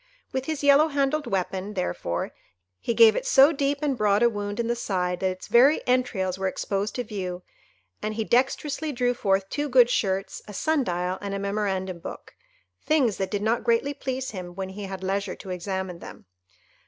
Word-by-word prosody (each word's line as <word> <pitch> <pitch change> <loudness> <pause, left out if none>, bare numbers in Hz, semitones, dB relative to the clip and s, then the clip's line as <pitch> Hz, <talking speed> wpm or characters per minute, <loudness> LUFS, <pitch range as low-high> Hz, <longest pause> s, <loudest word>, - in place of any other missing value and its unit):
With 260 0 -2
his 310 -1 -3
yellow 285 +2 +6
handled 285 0 0
weapon, 190 +2 -2
therefore, 90 - -2 0.5
he 235 - -2
gave 225 -1 +7
it - - -1
so 295 - +6
deep 280 -1 0
and 285 -3 +1
broad 210 -1 +2
a 235 - +5
wound 205 0 -4
in 235 - +1
the 240 - 0
side 180 -6 -1
that 190 - +1
its 185 0 -6
very 265 +6 +5
entrails 200 -8 0
were 190 - 0
exposed 200 +2 -2
to 245 - -2
view; 185 -5 -5 0.6
and 215 0 -3
he 220 - -1
dexterously 270 +6 0
drew 245 -2 +1
forth 195 -4 +1
two 290 +5 -2
good 245 -2 +6
shirts, 195 -3 -1
a 210 - -9
sun 315 +2 +1
dial, 180 -1 -2
and 200 -1 -3
a - - -3
memorandum 195 -3 -2
book, - - -9 0.5
things 270 -9 +2
that 190 -1 -2
did 205 0 -2
not 225 +2 +1
greatly 235 +5 +1
please 260 -2 -4
him 180 -3 -7
when 190 0 -4
he 200 +1 -7
had 190 -1 -6
leisure 195 +1 -1
to 190 - -9
examine 185 0 -4
them. - - -11
210 Hz, 195 wpm, -25 LUFS, 190-260 Hz, 0.6 s, gave